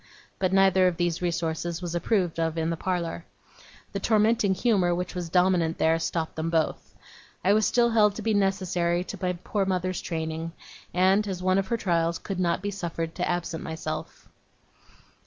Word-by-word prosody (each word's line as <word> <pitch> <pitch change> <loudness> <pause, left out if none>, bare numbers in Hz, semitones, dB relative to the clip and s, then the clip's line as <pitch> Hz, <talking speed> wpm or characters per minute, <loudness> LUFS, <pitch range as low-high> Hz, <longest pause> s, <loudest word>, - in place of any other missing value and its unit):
But 185 -1 +1
neither 190 -1 +5
of 175 -2 -1
these 175 -1 0
resources 170 -1 -2
was 175 -2 -5
approved 175 -2 0
of 165 0 0
in 160 +1 0
the - - -1
parlour. 170 -1 -2 0.7
The 200 - -3
tormenting 215 -1 +3
humour 185 -4 +2
which 180 +1 -3
was 175 -2 -4
dominant 180 -2 +2
there 160 +1 +3
stopped 165 -1 -2
them 160 +1 -2
both. 165 -1 -1 0.5
I 195 - +5
was 215 0 +3
still 235 -1 +3
held 210 -3 +4
to - - -6
be 225 - +1
necessary 185 -3 +1
to 200 +1 -8
my 180 -1 0
poor 205 -2 0
mother's 185 -1 -1
training, 160 0 -4 0.4
and, 190 +3 +3
as 185 -2 -4
one 185 +1 +3
of 195 - -2
her 235 - 0
trials, 170 -4 +1
could 195 -2 -5
not 175 +1 0
be 205 - -1
suffered 165 -4 -4
to - - -2
absent 175 -2 -2
myself. 155 -1 -6
180 Hz, 180 wpm, -26 LUFS, 165-195 Hz, 0.7 s, neither